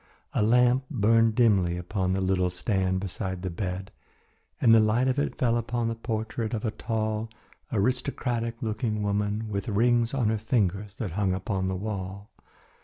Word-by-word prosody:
A -, -, +1 dB
lamp 125 Hz, +4 st, +4 dB
burned 115 Hz, -3 st, +3 dB
dimly 100 Hz, -8 st, +3 dB
upon 95 Hz, +1 st, -1 dB
the 95 Hz, -, 0 dB
little 95 Hz, -1 st, +1 dB
stand 95 Hz, 0 st, 0 dB
beside 95 Hz, -1 st, -4 dB
the 95 Hz, -, -2 dB
bed 95 Hz, +1 st, -4 dB, 0.7 s
and 115 Hz, -, +6 dB
the 115 Hz, -, +8 dB
light 110 Hz, +4 st, +3 dB
of 130 Hz, +2 st, +1 dB
it 145 Hz, -, -2 dB
fell 120 Hz, -2 st, +2 dB
upon 120 Hz, 0 st, -1 dB
the -, -, -1 dB
portrait 110 Hz, 0 st, -3 dB
of 110 Hz, -, -3 dB
a 110 Hz, -, 0 dB
tall, 110 Hz, 0 st, -2 dB, 0.4 s
aristocratic 120 Hz, +1 st, -1 dB
looking 110 Hz, -1 st, -1 dB
woman 105 Hz, +2 st, -1 dB
with 100 Hz, -2 st, -3 dB
rings 120 Hz, +3 st, +2 dB
on 120 Hz, -5 st, +2 dB
her 110 Hz, -1 st, 0 dB
fingers, 105 Hz, -3 st, 0 dB
that 105 Hz, -7 st, -3 dB
hung 95 Hz, 0 st, 0 dB
upon 95 Hz, 0 st, -2 dB
the 95 Hz, -, -1 dB
wall. 100 Hz, 0 st, -5 dB
110 Hz, 170 wpm, -27 LUFS, 95-115 Hz, 0.7 s, the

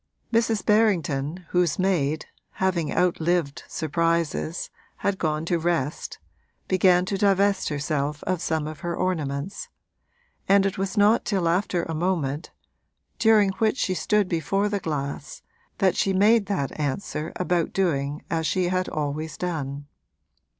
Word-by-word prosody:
Mrs. 225 Hz, -2 st, +2 dB
Berrington, 175 Hz, -7 st, +1 dB
whose 180 Hz, -3 st, +2 dB
maid, 160 Hz, -6 st, +1 dB, 0.3 s
having 175 Hz, -5 st, 0 dB
outlived 175 Hz, -4 st, +1 dB
surprises, 165 Hz, +1 st, -1 dB, 0.3 s
had 200 Hz, -1 st, +1 dB
gone 155 Hz, -1 st, -1 dB
to 170 Hz, 0 st, +1 dB
rest, 160 Hz, -4 st, -2 dB, 0.5 s
began 185 Hz, -1 st, +4 dB
to 195 Hz, 0 st, -2 dB
divest 200 Hz, 0 st, +2 dB
herself 145 Hz, 0 st, -2 dB
of 185 Hz, -2 st, -1 dB
some 160 Hz, -3 st, -1 dB
of 155 Hz, -1 st, -6 dB
her 170 Hz, -1 st, -3 dB
ornaments, 155 Hz, -2 st, -2 dB, 0.8 s
and 195 Hz, 0 st, +5 dB
it 195 Hz, -1 st, -1 dB
was 195 Hz, +2 st, -2 dB
not 210 Hz, +3 st, +5 dB
till 190 Hz, -5 st, 0 dB
after 175 Hz, 0 st, +1 dB
a 165 Hz, -, -4 dB
moment, 160 Hz, -3 st, -1 dB, 0.7 s
during 220 Hz, -3 st, +5 dB
which 220 Hz, +3 st, +2 dB
she 185 Hz, -, 0 dB
stood 205 Hz, +4 st, +1 dB
before 190 Hz, +5 st, 0 dB
the 205 Hz, -1 st, -1 dB
glass, 155 Hz, -, -4 dB, 0.3 s
that 190 Hz, -3 st, +3 dB
she 195 Hz, -, +1 dB
made 205 Hz, +2 st, +4 dB
that 155 Hz, -8 st, -2 dB
answer 150 Hz, +2 st, -3 dB
about 175 Hz, -2 st, 0 dB
doing 150 Hz, -6 st, -1 dB
as 160 Hz, -1 st, -1 dB
she 175 Hz, +4 st, +1 dB
had 185 Hz, 0 st, 0 dB
always 155 Hz, +1 st, -3 dB
done. 145 Hz, -5 st, -3 dB
175 Hz, 135 wpm, -25 LUFS, 155-195 Hz, 0.8 s, and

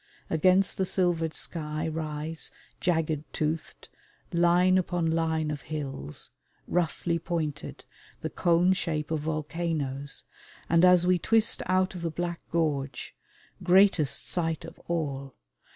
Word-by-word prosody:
Against 185 Hz, +5 st, +3 dB
the 190 Hz, -, +2 dB
silvered 175 Hz, -4 st, +1 dB
sky 155 Hz, -1 st, -4 dB
rise, 155 Hz, 0 st, -2 dB, 0.3 s
jagged 160 Hz, -4 st, 0 dB
toothed, 155 Hz, +1 st, -3 dB, 0.5 s
line 175 Hz, +2 st, +4 dB
upon 175 Hz, -2 st, -1 dB
line 160 Hz, -1 st, 0 dB
of 145 Hz, -2 st, -5 dB
hills, 135 Hz, -, -6 dB, 0.4 s
roughly 170 Hz, 0 st, 0 dB
pointed, 160 Hz, -5 st, -4 dB, 0.4 s
the -, -, -2 dB
cone 175 Hz, +1 st, +3 dB
shape 155 Hz, -4 st, -2 dB
of 160 Hz, -, +1 dB
volcanoes, 150 Hz, -2 st, -2 dB, 0.4 s
and 165 Hz, +1 st, +4 dB
as 180 Hz, -1 st, +7 dB
we 180 Hz, 0 st, +3 dB
twist 225 Hz, +5 st, +3 dB
out 185 Hz, +1 st, +2 dB
of 180 Hz, -, -7 dB
the 170 Hz, -, -1 dB
black 170 Hz, +1 st, -3 dB
gorge 145 Hz, -5 st, -1 dB, 0.5 s
greatest 180 Hz, -4 st, +4 dB
sight 165 Hz, -2 st, -2 dB
of 165 Hz, -, -11 dB
all! 140 Hz, -5 st, -3 dB
165 Hz, 120 wpm, -28 LUFS, 155-175 Hz, 0.5 s, as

